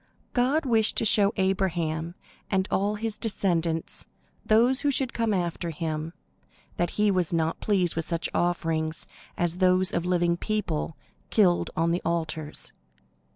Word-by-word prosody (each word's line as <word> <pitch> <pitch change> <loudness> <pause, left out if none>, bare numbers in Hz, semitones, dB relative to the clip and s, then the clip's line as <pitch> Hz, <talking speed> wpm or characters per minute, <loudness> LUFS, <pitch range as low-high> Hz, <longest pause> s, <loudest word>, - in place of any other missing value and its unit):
God 270 +5 +2
wished 225 -4 +2
to - - +4
show 205 -1 +5
Abraham 175 -4 0 0.3
and 190 -1 +1
all 205 +2 +1
his 220 0 -4
descendants, 170 -6 -1 0.4
those 240 +5 +4
who 290 - +2
should 265 -2 0
come 230 -1 0
after 175 -2 -1
him, 160 0 -4 0.6
that 175 - +1
he 210 -1 +3
was 180 -4 +1
not 165 -1 0
pleased 185 -5 +1
with 165 -1 -3
such 170 -1 -1
offerings 165 -2 -1 0.3
as 175 0 +1
those 185 0 +3
of 170 - 0
living 175 -1 +1
people, 175 -7 -2 0.3
killed 180 -5 +3
on 165 +1 +2
the 175 - 0
altars. 160 -2 -3
175 Hz, 145 wpm, -26 LUFS, 165-210 Hz, 0.6 s, show